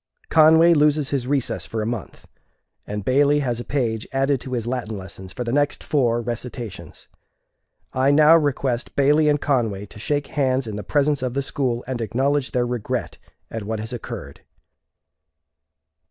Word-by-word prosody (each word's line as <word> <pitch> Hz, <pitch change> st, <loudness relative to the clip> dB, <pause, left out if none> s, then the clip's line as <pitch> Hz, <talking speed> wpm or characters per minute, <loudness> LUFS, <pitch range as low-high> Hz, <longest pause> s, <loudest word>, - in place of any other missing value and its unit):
Conway 160 Hz, +2 st, +6 dB
loses 150 Hz, -2 st, +2 dB
his 135 Hz, -3 st, -1 dB
recess 140 Hz, -2 st, -1 dB
for 110 Hz, -1 st, -3 dB
a -, -, -3 dB
month, 115 Hz, -4 st, -5 dB, 0.6 s
and 105 Hz, -1 st, -5 dB
Bailey 145 Hz, +3 st, +3 dB
has 120 Hz, -4 st, -1 dB
a -, -, -4 dB
page 115 Hz, -6 st, -2 dB
added 135 Hz, -1 st, +1 dB
to 130 Hz, -, -6 dB
his 120 Hz, -3 st, -2 dB
Latin 120 Hz, -3 st, -3 dB
lessons 95 Hz, 0 st, -9 dB
for 125 Hz, -, -4 dB
the 120 Hz, 0 st, -3 dB
next 145 Hz, 0 st, +1 dB
four 120 Hz, -5 st, +1 dB
recitations. 115 Hz, -, -7 dB, 0.9 s
I 130 Hz, +1 st, +2 dB
now 150 Hz, +3 st, +7 dB
request 140 Hz, -5 st, 0 dB
Bailey 150 Hz, +2 st, +4 dB
and 145 Hz, 0 st, +2 dB
Conway 115 Hz, -9 st, 0 dB
to 105 Hz, -, -13 dB
shake 145 Hz, +5 st, -1 dB
hands 135 Hz, -3 st, +1 dB
in 110 Hz, -2 st, -5 dB
the 105 Hz, -, -5 dB
presence 145 Hz, -1 st, +1 dB
of 130 Hz, -1 st, -3 dB
the 140 Hz, -, 0 dB
school, 125 Hz, -3 st, -2 dB
and 125 Hz, -2 st, -4 dB
acknowledge 135 Hz, +5 st, 0 dB
their 125 Hz, -1 st, 0 dB
regret 120 Hz, -3 st, -3 dB, 0.3 s
at 115 Hz, -, -4 dB
what 110 Hz, +1 st, -4 dB
has 110 Hz, +3 st, -5 dB
occurred." 120 Hz, -, -7 dB
130 Hz, 170 wpm, -22 LUFS, 115-145 Hz, 0.9 s, now